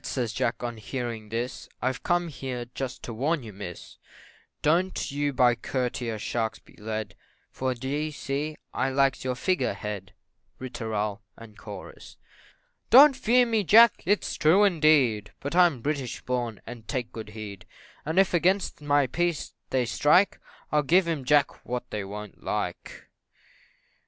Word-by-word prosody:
says 120 -4 -2
Jack 120 - -1
on 120 -1 -4
hearing 115 -1 -5
this, 120 +3 -4
"I've 130 +1 -2
come 175 0 +1
here 130 -4 -5
just 135 -2 -5
to 115 - -5
warn 145 +6 0
you, 110 -2 -9
Miss, 95 -3 -9 0.6
Don't 175 +2 +1
you 145 +1 0
by 125 -2 +4
courtier 120 -2 -3
sharks 110 +1 -2
be - - -21
led 110 0 -4 0.4
For, 130 -1 -2
d'ye 140 +5 -2
see, 150 +1 -4 0.2
I 135 - 0
likes 135 -1 +1
your 130 -1 -1
Figure 180 +8 0
Head 100 -2 -6 0.4
Ri 130 -1 -7
tooral, 105 -3 -2 0.2
&c. 115 -2 -11 0.7
"Don't 275 +3 +9
fear 245 +2 +4
me, 225 -3 +1
Jack 225 +4 +7
it's 205 +2 +1
true, 165 +7 +5
indeed, 150 - +3
but 145 +4 -4
I'm 175 -8 +4
British 140 -2 -2
born, 120 -4 -3
and 115 -3 -10
take 125 -4 -3
good 110 -2 -7
heed; 100 -3 -8 0.4
And 160 +4 -3
if 195 -1 +4
against 180 0 +1
my 145 -1 +3
peace 175 +4 -1 0.2
they 130 -2 +1
strike, 150 - +3 0.3
I'll 150 - +3
give 170 +5 +3
'em, 155 -6 -2
Jack, 145 +2 +2
what 125 0 -5
they 105 -2 -3
wo'n't 105 +1 -9
like." - - -4
130 Hz, 150 wpm, -27 LUFS, 115-155 Hz, 0.7 s, Don't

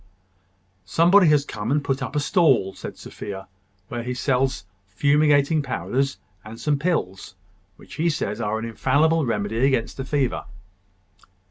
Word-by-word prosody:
"Somebody 175 - +4
has 150 -2 +4
come 105 -2 -5
and 145 0 +1
put 135 -1 -1
up 130 0 -5
a - - +2
stall," 145 - +2
said - - -8
Sophia, 95 -2 -8 0.4
"where 120 +3 -4
he 125 +1 -4
sells 130 -3 0 0.2
fumigating 145 +6 +3
powders, 135 0 -2 0.3
and 110 +1 -10
some 145 -2 0
pills, 140 - -2 0.4
which - - -15
he 170 - +3
says 115 -7 -2
are 110 0 -1
an 110 - -4
infallible 145 +6 +1
remedy 110 +1 -1
against 130 -4 +1
the 135 - -3
fever." 135 -1 -1
135 Hz, 145 wpm, -23 LUFS, 115-150 Hz, 0.4 s, Somebody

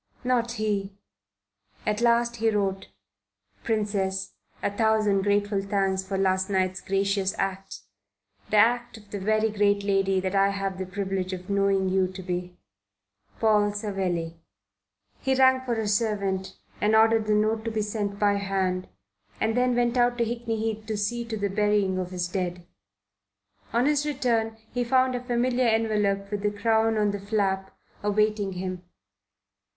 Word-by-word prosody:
Not 240 -2 +1
he.... 205 -3 -2 0.9
At 210 +1 0
last 235 0 +2
he 225 0 +2
wrote: 195 -3 -1 0.8
PRINCESS, 200 -3 -1 0.3
A - - +1
thousand 215 -3 +2
grateful 205 0 +1
thanks 195 -1 0
for 190 0 -3
last 190 0 +1
night's 185 -1 0
gracious 195 0 0
act 195 0 -3 0.7
the 215 - +2
act 240 +2 +3
of 205 -2 -17
the 205 - -4
very 215 +2 +1
great 205 -1 +2
lady 195 -1 +2
that 185 0 -2
I 195 0 +4
have 195 -1 -3
the 190 - -4
privilege 190 -1 -3
of 185 +1 -6
knowing 195 -1 +2
you 185 0 +2
to 190 0 -8
be. 180 0 -4 0.8
PAUL 210 -2 +3
SAVELLI. 185 -5 -2 0.8
He 265 0 +1
rang 260 0 +5
for 245 -2 -2
a 220 -1 -2
servant 200 -3 -1 0.2
and 215 +1 +3
ordered 225 0 +4
the 210 - +3
note 215 +1 +1
to - - 0
be 220 -1 -1
sent 205 -1 -3
by 205 -1 +2
hand, 190 -2 -1 0.5
and 220 0 0
then 250 0 +2
went 240 0 +1
out 245 0 +3
to 235 - +2
Hickney 230 -1 -3
Heath 220 0 -2
to 215 -1 -2
see 235 +4 -1
to 225 -1 -4
the 205 -1 0
burying 205 -2 +1
of 180 -1 -3
his 180 -1 -2
dead. 180 -1 -3 1.1
On 240 +2 +2
his 295 0 +2
return 235 -6 0 0.2
he 245 0 0
found 255 +1 +2
a 245 - -2
familiar 250 0 +1
envelope 210 -3 +1
with 205 -1 -2
the 210 - +1
crown 220 +1 +1
on 210 -1 +2
the 205 - -4
flap 195 -2 -1 0.2
awaiting 210 -1 +1
him. 185 0 -4
205 Hz, 160 wpm, -26 LUFS, 195-225 Hz, 1.1 s, rang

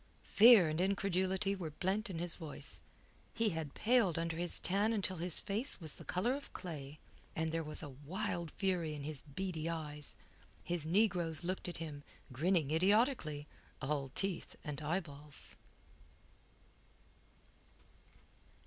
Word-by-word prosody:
Fear 215 -6 +9
and 155 +3 0
incredulity 190 0 +1
were 175 -5 -4
blent 195 +8 -1
in 180 - -4
his 170 0 -1
voice. 160 -4 -5 0.5
He 225 -1 +3
had 160 -5 -4
paled 225 -8 +3
under 165 0 -1
his 175 +1 -1
tan 205 +4 +2
until 190 -3 0
his 175 0 +1
face 220 +7 0
was 160 -5 -5
the - - -10
colour 210 +8 +1
of 280 +1 -6
clay, 150 -5 -6 0.4
and 160 0 0
there 165 0 0
was 150 +1 -6
a 145 - -5
wild 175 0 -2
fury 175 -4 0
in 145 - -6
his 150 -1 -5
beady 165 +1 -3
eyes. 150 -3 -2 0.5
His 170 -2 -1
negroes 175 -4 +3
looked 185 +2 -2
at 175 - -3
him, 155 -3 -6 0.3
grinning 155 +2 +2
idiotically, 185 - +3 0.3
all 140 -1 -1
teeth 195 -2 -1
and 150 -2 -4
eyeballs. 150 -3 -4
170 Hz, 140 wpm, -36 LUFS, 155-195 Hz, 0.5 s, Fear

